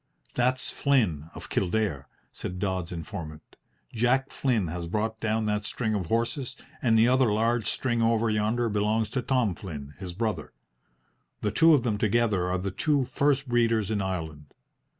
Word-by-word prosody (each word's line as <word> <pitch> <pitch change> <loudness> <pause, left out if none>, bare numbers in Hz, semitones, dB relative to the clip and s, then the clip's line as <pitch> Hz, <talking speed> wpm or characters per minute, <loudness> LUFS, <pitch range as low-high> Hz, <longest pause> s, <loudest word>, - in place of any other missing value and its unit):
"That's 130 +1 +1
Flynn 100 - +1
of - - -8
Kildare," 90 -8 -1 0.2
said 90 - -6
Dodds's 95 -2 -2
informant. 80 -3 -7 0.4
"Jack 125 +4 +1
Flynn 120 -8 +1
has 85 +1 -4
brought 110 +4 -2
down 110 0 0
that 105 0 0
string 110 +1 -2
of 95 -5 -2
horses, 120 - -1 0.3
and 115 -3 +3
the 110 +1 +5
other 130 -2 +4
large 115 +1 +1
string 120 -3 0
over 115 0 +2
yonder 110 +2 +1
belongs 105 +1 0
to 130 - -1
Tom 125 -6 +1
Flynn, 75 -6 -8
his 90 -3 -6
brother. 110 +3 -3 0.9
The 105 - 0
two 165 -1 +6
of 130 - +1
them 110 -4 -1
together 105 -4 +2
are 90 - +1
the 95 +1 -3
two 145 +7 +1
first 140 +1 +1
breeders 115 -3 +2
in 105 -2 0
Ireland." 80 -6 -5
110 Hz, 165 wpm, -27 LUFS, 95-120 Hz, 0.9 s, two